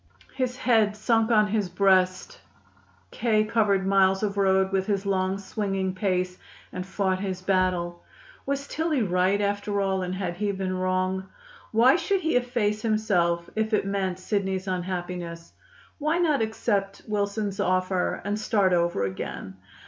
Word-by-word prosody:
His 255 -1 -2
head 220 -5 +2
sunk 225 +1 +2
on 215 -2 +5
his 205 -3 0
breast, 185 -1 +2 0.7
K. 220 -2 +2
covered 210 -3 +1
miles 195 0 +3
of 205 -1 -1
road 190 -1 +2
with 190 -1 0
his 200 -1 -1
long, 190 -1 0
swinging 195 -1 -2
pace, 185 -1 -1 0.3
and 180 - -4
fought 190 0 -1
his 190 -2 -4
battle. 185 -2 0 0.4
Was 280 0 -3
Tillie 310 -5 0
right, 185 +1 +2
after 205 0 -1
all, 190 -1 0
and 180 0 -3
had 180 -2 -3
he 205 +1 0
been 190 -1 -2
wrong? 185 +1 -1 0.4
Why 245 +7 +5
should 375 +3 0
he 320 -5 0
efface 240 -4 0
himself, 180 -6 +1
if 220 0 +1
it 210 - 0
meant 195 -2 -1
Sidney's 190 -1 -2
unhappiness? 175 -2 -4 0.5
Why 305 +3 +1
not 310 -7 +2
accept 205 -3 -1
Wilson's 205 -1 -2
offer 185 -1 0
and 205 +1 -1
start 205 -4 +2
over 170 - +1
again? 95 0 -5
195 Hz, 150 wpm, -26 LUFS, 185-215 Hz, 0.7 s, on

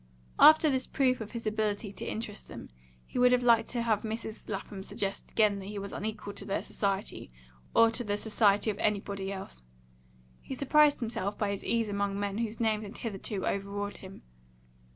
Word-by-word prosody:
After 315 +1 +8
this 260 -3 0
proof 255 -3 +1
of 215 - -7
his 235 -1 -5
ability 215 -1 -1
to - - -7
interest 215 -2 -6
them, - - -10 0.3
he - - -4
would 250 0 +6
have 250 0 +3
liked 230 -2 +4
to 240 -2 -1
have 220 -3 +1
Mrs. 220 0 -5
Lapham 195 -1 -5
suggest 195 0 -4
again 210 -2 +3
that 190 - -8
he 205 0 -6
was 200 0 -5
unequal 210 -1 -4
to 200 - -5
their 195 - -2
society, 195 - -3 0.4
or 230 0 +6
to 240 +2 -1
the 205 -2 -1
society 210 -1 +2
of 205 - -9
anybody 200 -2 -1
else. 190 - -8 0.8
He 265 - -6
surprised 290 +2 +4
himself 210 -3 -2
by 205 -2 0
his 200 - -4
ease 230 -1 +1
among 200 -1 -1
men 205 +1 -2
whose 225 -1 -2
names 220 -2 +1
had 210 +1 -8
hitherto 200 -2 -4
overawed 200 +1 -3
him. 190 0 -12
210 Hz, 190 wpm, -30 LUFS, 200-230 Hz, 0.8 s, After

